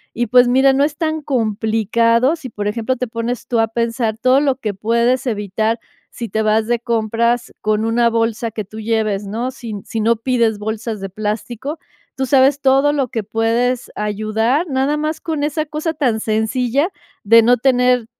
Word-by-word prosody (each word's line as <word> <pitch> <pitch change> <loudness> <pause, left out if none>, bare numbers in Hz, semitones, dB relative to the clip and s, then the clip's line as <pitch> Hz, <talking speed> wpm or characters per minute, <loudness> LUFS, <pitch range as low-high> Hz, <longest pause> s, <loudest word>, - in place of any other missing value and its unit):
Y, 240 0 -1
pues, 250 +2 +5
mira, 265 +2 +4
no 275 +1 +2
es 295 0 -1
tan 315 -2 -1
complicado 230 - +1
si, 300 -6 -9
por 205 -2 -4
ejemplo, 230 +4 -1
te 250 - -2
pones 230 +1 -4
tú 235 -2 0
a 225 - +3
pensar 230 -1 -1
todo 255 +4 +3
lo 275 -3 +2
que 215 -6 -3
puedes 235 +5 +1
evitar 220 0 -1 0.3
si 235 -2 -6
te 220 +3 -1
vas 215 +1 +2
de 240 0 +2
compras 235 +1 0
con 215 0 0
una 235 +1 +2
bolsa 230 0 -1
que 215 -1 -4
tú 215 +3 -10
lleves, 215 -2 -1
¿no? 225 +5 -3
Sin 230 -6 -7
si 225 - -4
no 230 +2 +2
pides 230 -3 0
bolsas 220 +1 -4
de 195 0 -5
plástico. 220 - -4 0.4
Tú 265 0 -2
sabes 275 +1 +4
todo 275 +2 +3
lo 275 -3 0
que 225 -2 -3
puedes 230 +4 0
ayudar, 215 - 0
nada 270 +2 0
más 305 +1 -2
con 310 -3 -3
esa 305 +1 -1
cosa 310 +2 -3
tan 250 -7 0
sencilla 240 - 0 0.3
de 230 +3 +7
no 245 +2 +4
tener 250 -1 +2
235 Hz, 185 wpm, -18 LUFS, 220-265 Hz, 0.4 s, de